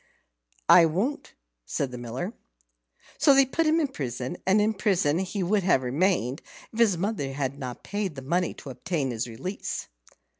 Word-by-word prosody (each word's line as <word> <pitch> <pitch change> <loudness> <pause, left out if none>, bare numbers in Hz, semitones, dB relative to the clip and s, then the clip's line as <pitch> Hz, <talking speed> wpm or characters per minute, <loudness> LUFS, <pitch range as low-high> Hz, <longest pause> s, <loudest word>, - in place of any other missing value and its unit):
"I 170 -2 +8
won't," 205 - -2 0.3
said 130 - -2
the 125 - -6
Miller. 125 - -4 0.9
So 285 -2 +6
they 275 0 +6
put 320 +5 0
him 315 +2 +4
in 305 - +2
prison, 130 - -4
and 195 +3 +5
in 215 +1 +2
prison 180 -7 +1
he 190 +1 -2
would 200 +3 +2
have 175 -8 +3
remained 140 - +1 0.3
if 225 - -6
his 210 -6 +4
mother 175 -8 -2
had 140 0 -3
not 125 -3 -6
paid 200 -5 -3
the 135 - -7
money 175 +5 0
to 140 - -9
obtain 145 -1 -2
his 115 +1 -3
release. 135 - -5
175 Hz, 175 wpm, -27 LUFS, 135-205 Hz, 0.9 s, I